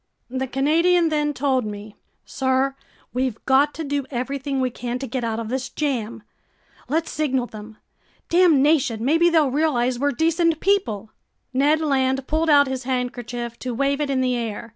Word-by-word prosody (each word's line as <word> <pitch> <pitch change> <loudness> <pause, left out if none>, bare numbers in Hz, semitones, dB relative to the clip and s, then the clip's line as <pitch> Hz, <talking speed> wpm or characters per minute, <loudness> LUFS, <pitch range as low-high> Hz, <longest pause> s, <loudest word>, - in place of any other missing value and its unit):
The 260 0 -2
Canadian 330 +6 +2
then 300 -1 0
told 265 -2 0
me: 210 0 -7 0.3
"Sir, 265 0 0 0.4
we've 250 -2 -1
got 275 +2 +4
to 325 - -4
do 285 -2 -2
everything 270 +2 -3
we 255 -1 0
can 245 +1 -4
to 270 - -5
get 250 0 -4
out 225 -1 -2
of 225 -1 -5
this 260 +1 -3
jam! 235 -7 -3 0.7
Let's 320 +3 -1
signal 265 -5 0
them! 215 -1 -11 0.5
Damnation! 290 -8 +3
Maybe 330 +5 +4
they'll 315 -5 +3
realize 255 -4 +1
we're 285 +1 +1
decent 330 +3 +1
people!" 225 - 0 0.4
Ned 290 +4 +3
Land 265 -3 +1
pulled 315 +2 0
out 285 -1 +6
his 260 -1 -4
handkerchief 245 -2 -3
to 250 -2 -4
wave 275 +3 0
it 290 - -1
in 265 -1 +1
the 255 -1 +1
air. 230 -1 -4
265 Hz, 165 wpm, -22 LUFS, 245-300 Hz, 0.7 s, out